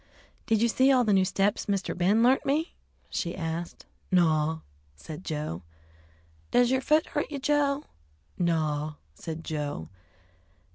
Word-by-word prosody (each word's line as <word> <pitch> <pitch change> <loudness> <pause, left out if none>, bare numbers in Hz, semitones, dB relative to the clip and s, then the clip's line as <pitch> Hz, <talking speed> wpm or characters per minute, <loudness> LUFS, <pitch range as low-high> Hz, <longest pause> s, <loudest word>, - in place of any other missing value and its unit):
"Did 225 -1 +2
you - - +5
see 260 +4 +4
all 255 -2 +4
the 215 -3 +2
new 190 -1 +5
steps 195 +2 0
Mr. 200 -2 -1
Ben 195 +6 +3
learnt 255 +2 +4
me?" 310 +5 0 0.3
she 170 - -3
asked. 165 0 -4 0.3
"Naw," 160 -3 +2 0.3
said 150 - -9
Joe. 150 - -4 0.9
"Does 245 0 +4
yer 260 0 +2
foot 305 +3 +3
hurt 295 - -2
you, 285 - -3
Joe?" 285 0 +1 0.5
"Naw," 155 -3 0 0.2
said 160 - -7
Joe. 145 - -4
185 Hz, 140 wpm, -28 LUFS, 160-260 Hz, 0.9 s, you